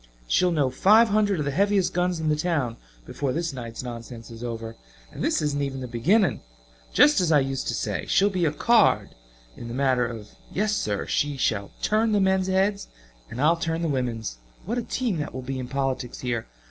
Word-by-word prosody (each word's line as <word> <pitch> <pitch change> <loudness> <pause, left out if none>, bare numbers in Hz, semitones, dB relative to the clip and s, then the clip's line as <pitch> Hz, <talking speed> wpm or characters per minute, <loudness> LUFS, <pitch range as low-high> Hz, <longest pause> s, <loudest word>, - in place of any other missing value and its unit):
She'll 180 - +3
know 145 -6 +1
five 215 - +5
hundred 205 -2 +2
of 150 - -2
the 140 - -1
heaviest 200 +4 +2
guns 180 -1 0
in 160 - -2
the 155 - +3
town 150 -8 -1 0.3
before 135 - -3
this 165 -1 -2
night's 120 -2 -6
nonsense 115 -1 -8
is 115 +1 -9
over. 115 -1 -5 0.4
And - - -6
this - - +1
isn't 145 -1 0
even 135 -1 -3
the 130 - -5
beginning. 180 - +2 0.5
Just 290 -8 +5
as 170 -3 +1
I 150 - +6
used 135 -1 -2
to - - -1
say - - -3
she'll 200 +1 +3
be 180 -3 0
a 150 - +2
card 225 +8 +3 0.4
in 120 - -8
the 120 - -6
matter 130 -3 +2
of 110 -3 -8 0.2
yes 210 +2 0
sir! 105 - -2
She 145 -1 -1
shall 105 -6 0
turn 215 +1 +2
the 205 - +3
men's 190 -1 +2
heads 195 +2 +1 0.4
and 120 - -7
I'll 160 +4 +4
turn 165 0 -2
the - - +1
women's! 115 - -3 0.3
What 235 +5 -1
a - - -1
team 235 -8 -2
that 150 -3 -4
will 130 - -5
be 130 +1 -4
in 125 - -5
politics 135 -2 -3
here. 120 -3 -2
145 Hz, 210 wpm, -25 LUFS, 125-190 Hz, 0.5 s, I